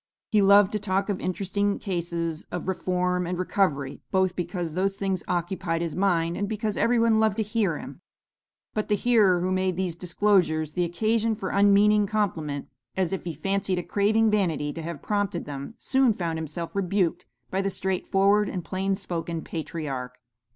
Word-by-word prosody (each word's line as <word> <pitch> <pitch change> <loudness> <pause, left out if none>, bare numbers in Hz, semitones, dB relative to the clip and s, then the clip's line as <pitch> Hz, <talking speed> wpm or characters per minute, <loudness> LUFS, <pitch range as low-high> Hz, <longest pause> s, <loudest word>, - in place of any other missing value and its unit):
He 215 -3 +4
loved 200 0 +6
to 210 - -1
talk 195 0 -1
of 200 - -1
interesting 200 +2 -1
cases 170 -3 -3
of 180 - -4
reform 180 -1 0
and 180 0 -2
recovery, 155 -7 0
both 190 -1 +1
because 175 -2 -3
those 195 +3 0
things 190 -3 -1
occupied 175 -1 -1
his 165 -3 -3
mind, 170 -3 +1
and 205 0 -2
because 215 -1 -2
every 240 +1 +2
one 230 -1 +4
loved 220 -2 +2
to 220 - +1
hear 210 -6 0
him; - - -9 0.7
but 215 - -2
the 210 - +2
hearer 205 -6 +3
who 185 +1 0
made 185 -1 +1
these 180 -2 -2
disclosures 170 -4 +1
the 175 +1 +1
occasion 220 +5 +1
for 190 -2 -4
unmeaning 205 +1 +4
compliment, 165 -9 -2 0.3
as 190 -1 0
if 190 - -4
he 170 - -3
fancied 195 +3 -1
a 175 - -2
craving 215 +4 +2
vanity 165 -8 0
to 165 - -6
have 165 -2 -6
prompted 205 -4 -1
them, 145 +9 -7
soon 265 -3 +3
found 165 -4 -3
himself 160 +3 -5
rebuked 190 -2 0 0.2
by 190 - 0
the 195 - 0
straightforward 195 +2 +1
and 180 -3 -5
plain 195 +2 -1
spoken 170 -3 -4
patriarch. 140 -6 -5
185 Hz, 175 wpm, -26 LUFS, 170-205 Hz, 0.7 s, loved